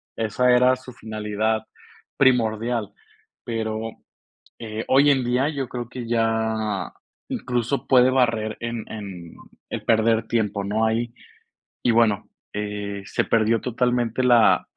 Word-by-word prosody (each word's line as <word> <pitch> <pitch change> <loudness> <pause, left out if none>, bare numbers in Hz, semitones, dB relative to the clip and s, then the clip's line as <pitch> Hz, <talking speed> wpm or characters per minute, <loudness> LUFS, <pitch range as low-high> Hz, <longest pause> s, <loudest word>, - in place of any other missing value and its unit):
esa 115 +3 +1
era 125 +1 +5
su 130 0 -12
finalidad 110 0 -2 0.5
primordial. 115 -3 +2 0.5
Pero, 110 -1 -3 0.7
eh, 110 0 -5
hoy 140 +2 +5
en 130 -3 +2
día, 125 +4 +1
yo 135 -5 -3
creo 120 -2 -5
que 120 -1 -7
ya 110 -4 0 0.4
incluso 125 +2 -2
puede 130 -1 +6
barrer 115 -4 +1
en 115 -1 -4
en 95 -6 -8 0.4
el - - -4
perder 110 0 +2
tiempo, 105 -3 0
¿no?, 110 +3 +1
ahí. 115 +1 -1 0.7
Y - - +3
bueno, 110 -3 +2 0.3
eh, 105 -1 -4
se - - 0
perdió 115 0 +2
totalmente 125 0 0
la 120 -2 +4
115 Hz, 125 wpm, -23 LUFS, 110-125 Hz, 0.7 s, puede